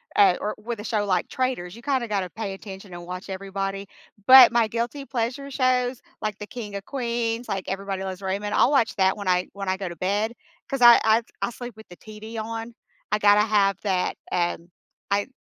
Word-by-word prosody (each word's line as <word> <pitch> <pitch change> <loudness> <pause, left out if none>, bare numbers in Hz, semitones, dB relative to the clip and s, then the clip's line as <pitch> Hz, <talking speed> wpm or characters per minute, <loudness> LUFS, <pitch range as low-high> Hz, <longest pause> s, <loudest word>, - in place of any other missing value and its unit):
uh, 195 -3 +5
or 210 - -2
with 230 +1 -6
a - - -6
show 215 -2 -1
like 185 -3 0
Traitors, 250 -9 -2
you 235 - -13
kinda 260 -4 0
gotta 195 -4 -2
pay 205 -1 -4
attention 195 -1 -10
and 175 0 -8
watch 180 +3 -7
everybody, 195 +1 -4 0.4
but 260 0 +10
my 235 -1 +3
guilty 235 +5 -3
pleasure 265 +2 -3
shows, 255 -1 +1 0.2
like 215 -1 -1
the 210 - -7
King 210 -4 -7
of 200 - -5
Queens, 235 -2 -2
like 195 -1 -3
Everybody 195 0 -3
Loves 190 0 -6
Raymond, 200 +2 -2
I'll - - +4
watch 245 -4 +2
that 190 -1 +3
when 205 -2 -7
I 180 0 +2
when 195 -1 -4
I 190 - 0
go 190 -1 -4
to 170 - -7
bed 205 +6 -1 0.3
'cause 275 -2 -3
I 240 -1 +9
I 220 +1 +4 0.2
I - - 0
sleep 240 -1 -8
with 220 - -13
the 175 - -11
TV 220 +1 -9
on, 225 +1 -5 0.4
I 210 - +2
gotta 205 0 +6
have 205 -3 +2
that 190 -3 0 0.2
and 175 -1 -1 0.4
I 200 0 +1
210 Hz, 210 wpm, -24 LUFS, 195-235 Hz, 0.4 s, but